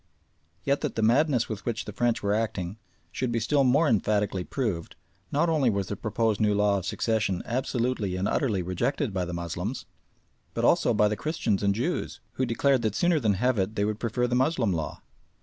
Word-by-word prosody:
Yet 140 +1 +1
that - - -2
the 110 - 0
madness 125 +1 +3
with 110 -2 -5
which 115 -2 -3
the - - -7
French 120 -1 0
were 100 0 +1
acting 105 -3 -2 0.3
should 125 +4 -2
be 115 - 0
still 140 +5 +2
more 140 +5 +4
emphatically 105 -4 +1
proved, 100 - -3 0.4
not 150 +4 +2
only 155 -6 +3
was 100 -3 -1
the 105 - -2
proposed 110 -1 -1
new 105 -1 +3
law 100 -1 +2
of 95 - -7
succession 110 -5 0
absolutely 120 -5 -1
and 95 +2 -1
utterly 105 -10 0
rejected 100 - -1
by 90 -2 -1
the 90 - -5
Moslems, 85 -1 -4 0.7
but - - +1
also - - +3
by 105 - +4
the 105 - -1
Christians 120 - -1
and 100 -1 +2
Jews, 145 - -2
who 130 - -1
declared 130 +2 +2
that 110 -2 -1
sooner 175 -2 +3
than 110 -6 +2
have 125 +3 +1
it 95 +3 -1
they 100 - +1
would 105 0 -2
prefer 125 +2 0
the 120 - -2
Moslem 125 - +2
law. 80 -2 -4
110 Hz, 200 wpm, -27 LUFS, 100-130 Hz, 0.7 s, more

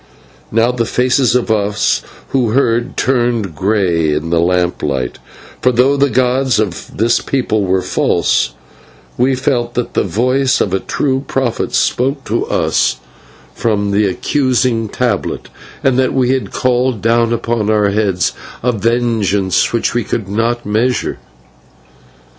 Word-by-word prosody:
Now 115 +2 +3
the 120 -2 -1
faces 125 +1 +2
of 120 -2 +1
us 105 -1 +1 0.3
who 120 -5 +1
heard 120 -2 +1
turned 120 -7 0
grey 90 -4 +1
in 75 +2 -3
the 85 - +3
lamplight, 85 -7 -1 0.4
for 125 - +3
though 125 +4 +3
the 140 0 +2
gods 130 0 +1
of 100 -5 -4
this 115 +2 +2
people 110 -6 0
were 95 0 +1
false, - - +1 0.6
we 130 +2 +2
felt 125 -3 -1
that 125 - -2
the - - +1
voice 125 +7 +1
of 95 - 0
a 95 - +2
true 135 +4 -1
prophet 130 -4 -1
spoke 135 +2 0
to 115 +2 -1
us - - +1 0.6
from 105 -3 0
that 100 0 +2
accusing 125 0 0
tablet, 120 -3 -2 0.3
and 130 -1 +2
that 130 0 +1
we 130 -1 +2
had 130 -1 -1
called 125 -3 0
down 115 0 +2
upon 115 -2 -1
our 105 -2 +3
heads 100 -3 0 0.3
a 125 - +2
vengeance 110 -4 +1
which 115 -1 0
we 120 0 0
could 105 -1 -3
not 115 +4 -1
measure. 115 +5 0
115 Hz, 140 wpm, -15 LUFS, 100-125 Hz, 0.6 s, Now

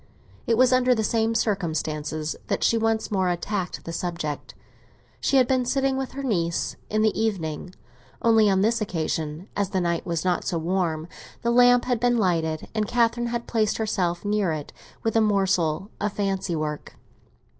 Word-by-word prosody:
It 230 - +3
was 255 +1 +5
under 255 0 +4
the 220 - 0
same 225 +1 +1
circumstances 155 -7 -1
that - - -1
she - - +4
once 225 -1 0
more 190 -3 +1
attacked 180 +1 -3
the 165 - -5
subject. 165 -4 -4 0.6
She 275 - +2
had 255 -2 +5
been 260 -1 +2
sitting 270 +1 +1
with 265 -1 -3
her 275 +1 -5
niece 170 -9 -1
in 215 0 +1
the 220 - +3
evening; 185 -5 -2 0.4
only 225 -2 +4
on 190 -1 +3
this 230 +2 +2
occasion, 160 -2 -3
as 200 -2 0
the 190 - 0
night 170 -1 0
was 170 -1 -2
not 180 -1 +1
so 170 - -1
warm, 165 -2 -1 0.4
the 235 - +2
lamp 245 0 +5
had 245 -2 0
been 245 0 +2
lighted, 165 -6 0
and 215 -1 0
Catherine 240 +1 +1
had 235 0 -3
placed 220 -2 0
herself 190 -5 -1
near 205 -4 +1
it 150 -2 -5 0.3
with 225 - 0
a 225 - +5
morsel 195 -3 +1
of 210 0 -1
fancy 195 -3 -1
work. 150 -1 -4
200 Hz, 175 wpm, -25 LUFS, 170-230 Hz, 0.6 s, was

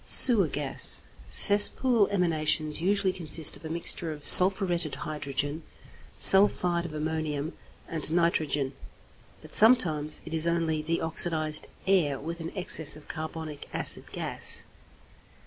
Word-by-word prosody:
=Sewer 220 -9 +6
Gas.= 145 -1 +1 0.3
Cesspool 210 +2 +3
emanations 155 -5 -3
usually 195 +1 -1
consist 160 -3 +3
of - - -6
a 160 - -10
mixture 165 0 -1
of 150 -1 -12
sulphuretted 180 -4 +6
hydrogen, 145 0 -8 0.6
sulphide 180 -3 +2
of 155 - -14
ammonium, 155 0 -7 0.3
and 160 -1 -6
nitrogen; 155 -5 -3 0.7
but - - -14
sometimes 160 -10 +2
it 160 - -9
is 160 +1 -2
only 165 -2 -4
deoxidized 160 -1 -2 0.2
air 170 -8 -2
with 165 +3 -9
an 165 0 -9
excess 160 -5 +3
of 150 - -20
carbonic 155 -1 -10
acid - - -2
gas. - - -2
160 Hz, 120 wpm, -24 LUFS, 155-180 Hz, 0.7 s, =Sewer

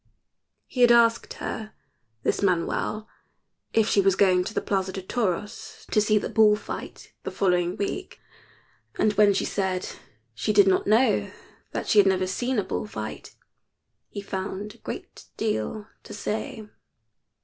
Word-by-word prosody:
He 250 - -4
had 240 -1 +7
asked 230 -1 +4
her, 220 -1 -5 0.5
this - - 0
Manuel, 200 +3 0 0.6
if 220 -1 +3
she 200 - +4
was 195 -1 +3
going 185 -2 +4
to - - -5
the - - +2
Plaza 190 -1 -1
de 190 0 -6
Toros 205 -1 -3
to 210 - +4
see 215 0 +3
the - - -1
bull 215 -1 +5
fight 210 - -8
the - - -4
following 180 -2 +1
week, 365 - -4 0.8
and 215 - +2
when 205 0 +5
she 195 - 0
said 190 -2 -1 0.5
she 210 - -1
did 200 -1 +6
not 190 - +2
know 225 +5 +3 0.4
that - - -3
she 210 - +5
had 200 - +6
never 185 -1 +2
seen 245 +7 -2
a 205 - +2
bull - - -3
fight - - -7 0.7
he 200 - -6
found 200 +1 -5
a - - -20
great - - -8
deal 210 - -2 0.2
to 210 - -10
say. 220 +2 -4
205 Hz, 160 wpm, -25 LUFS, 190-220 Hz, 0.8 s, had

